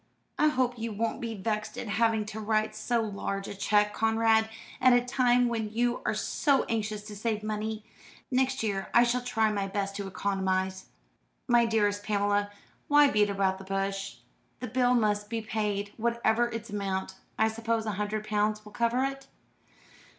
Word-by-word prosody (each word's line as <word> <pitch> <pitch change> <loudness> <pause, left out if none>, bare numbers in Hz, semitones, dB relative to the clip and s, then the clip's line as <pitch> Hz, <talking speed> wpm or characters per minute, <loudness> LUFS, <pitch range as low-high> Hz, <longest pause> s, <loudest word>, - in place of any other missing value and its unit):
I 305 - +5
hope 255 -4 0
you 230 0 -3
won't 225 +2 -2
be 230 -1 -4
vexed 215 +1 -3
at - - -5
having 220 +1 +1
to 215 +1 -6
write 215 0 0
so 230 +2 0
large 200 -1 -4
a - - -5
cheque, 210 +1 +2
Conrad, 225 0 +3 0.3
at 255 -1 +6
a 245 0 +3
time 250 -1 +3
when 225 -2 -2
you 240 +2 0
are - - +1
so 280 -3 +1
anxious 215 -2 -2
to 210 0 -9
save 215 0 -2
money. 215 0 -3 0.5
Next 265 0 +1
year 195 -3 -2
I 235 - +8
shall 245 +1 +1
try 225 -3 +1
my 200 -2 -1
best 195 0 -3
to 200 -1 -4
economise." 190 -1 -1 0.6
"My 240 -2 +4
dearest 205 -2 +1
Pamela, 205 -1 +1 0.4
why 290 -1 +6
beat 210 -1 +3
about 195 -1 0
the - - -9
bush? 195 0 -3 0.4
The 250 - -4
bill 250 +1 +2
must 210 -2 +1
be 230 - -2
paid, 210 -2 -2
whatever 235 0 +1
its 230 -2 -6
amount. 195 -2 -3 0.2
I 220 - +4
suppose 225 0 -1
a 215 - -1
hundred 210 +2 -3
pounds 215 0 0
will 210 - -11
cover 235 +2 +1
it?" 270 0 -4
215 Hz, 175 wpm, -29 LUFS, 205-235 Hz, 0.6 s, I